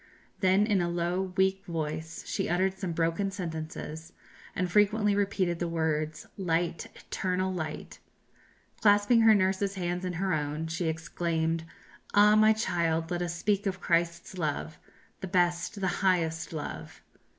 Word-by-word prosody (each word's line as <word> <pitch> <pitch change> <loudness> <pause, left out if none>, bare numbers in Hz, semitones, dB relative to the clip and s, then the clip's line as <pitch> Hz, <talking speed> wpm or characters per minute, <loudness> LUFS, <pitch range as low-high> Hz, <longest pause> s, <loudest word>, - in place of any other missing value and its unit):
Then 190 +1 +4
in 205 -4 +2
a 175 - 0
low 175 +2 -1
weak 190 0 +2
voice 160 -1 -4
she - - -2
uttered 185 +2 +1
some 190 -2 -4
broken 165 +4 0
sentences, 160 -3 -6 0.4
and 185 - 0
frequently 210 +1 +3
repeated 195 -4 0
the 175 - -1
words, 155 -2 -1
"Light, 170 -3 -1
eternal 185 0 -2
light!" 155 -4 -5 0.8
Clasping 205 +3 +5
her 225 -1 +7
nurse's 195 0 +1
hands 180 -1 -2
in 180 -1 -2
her 185 +2 -1
own, 150 +1 -2
she 165 +1 -2
exclaimed, 165 0 -1 0.5
"Ah, 210 +1 +7
my 215 0 +6
child, 170 -6 0
let 175 0 -1
us 170 -1 -2
speak 200 +3 0
of 190 -1 -2
Christ's 170 +1 -1
love, 155 0 -3 0.4
the 190 - -5
best, 175 +2 +1
the 190 - 0
highest 170 -4 +1
love!" 155 -3 -7
175 Hz, 145 wpm, -29 LUFS, 165-195 Hz, 0.8 s, her